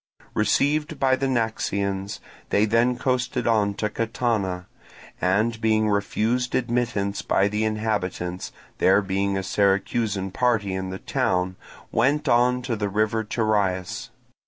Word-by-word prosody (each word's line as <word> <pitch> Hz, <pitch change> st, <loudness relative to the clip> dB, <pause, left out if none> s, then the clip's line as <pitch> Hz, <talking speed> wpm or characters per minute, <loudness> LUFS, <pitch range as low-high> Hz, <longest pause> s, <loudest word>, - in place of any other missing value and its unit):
Received 150 Hz, +7 st, +1 dB
by 130 Hz, -1 st, +4 dB
the 135 Hz, +1 st, -1 dB
Naxians, 100 Hz, -5 st, -1 dB, 0.3 s
they 105 Hz, -, +3 dB
then 115 Hz, +3 st, +2 dB
coasted 125 Hz, 0 st, -1 dB
on 105 Hz, -3 st, +2 dB
to 105 Hz, -, -1 dB
Catana, 110 Hz, -5 st, -1 dB, 0.6 s
and 110 Hz, +6 st, +1 dB
being 110 Hz, -1 st, +2 dB
refused 115 Hz, +5 st, 0 dB
admittance 120 Hz, -5 st, 0 dB
by 100 Hz, -, +2 dB
the 105 Hz, +1 st, -1 dB
inhabitants, 105 Hz, -5 st, -2 dB, 0.3 s
there 95 Hz, +2 st, +4 dB
being 95 Hz, +1 st, 0 dB
a 95 Hz, -, -2 dB
Syracusan 100 Hz, 0 st, 0 dB
party 110 Hz, -4 st, +1 dB
in 95 Hz, 0 st, -3 dB
the 95 Hz, -, -5 dB
town, 95 Hz, -7 st, 0 dB, 0.4 s
went 140 Hz, +6 st, +2 dB
on 125 Hz, +1 st, +3 dB
to 120 Hz, -2 st, -1 dB
the 105 Hz, -1 st, -2 dB
river 110 Hz, +2 st, +1 dB
Terias. 105 Hz, -5 st, -1 dB
110 Hz, 130 wpm, -24 LUFS, 100-120 Hz, 0.6 s, by